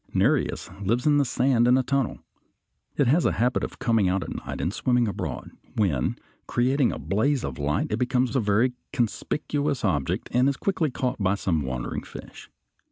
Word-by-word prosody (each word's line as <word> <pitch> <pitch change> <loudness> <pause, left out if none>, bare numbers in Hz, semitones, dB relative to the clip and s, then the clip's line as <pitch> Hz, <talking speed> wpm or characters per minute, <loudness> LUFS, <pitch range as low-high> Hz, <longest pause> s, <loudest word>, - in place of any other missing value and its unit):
Nereis - - +1 0.2
lives 115 +5 0
in 150 -1 +4
the 140 - +3
sand 120 -1 +2
in 125 +1 +5
a 130 - +2
tunnel. 135 -2 -1 0.8
It 140 - +3
has 150 +8 +3
a - - +2
habit 125 +2 +1
of - - -5
coming 115 -5 +2
out 95 -1 0
at - - -6
night - - -6
and 85 - -1
swimming 125 -1 +1
abroad, 100 - -4 0.2
when, 90 - +1 0.3
creating 130 +2 +2
a - - -5
blaze 125 +7 0
of - - -5
light, 70 +1 -1
it 105 - 0
becomes 125 -1 +1
a - - +4
very 110 +4 +2 0.2
conspicuous 145 +2 -1
object 70 -9 0
and 125 +3 +3
is 140 - -2
quickly 180 -6 0
caught 125 -1 -2
by 95 +1 +2
some 85 -6 0
wandering 65 -2 -3
fish. - - -11
120 Hz, 185 wpm, -25 LUFS, 100-135 Hz, 0.8 s, in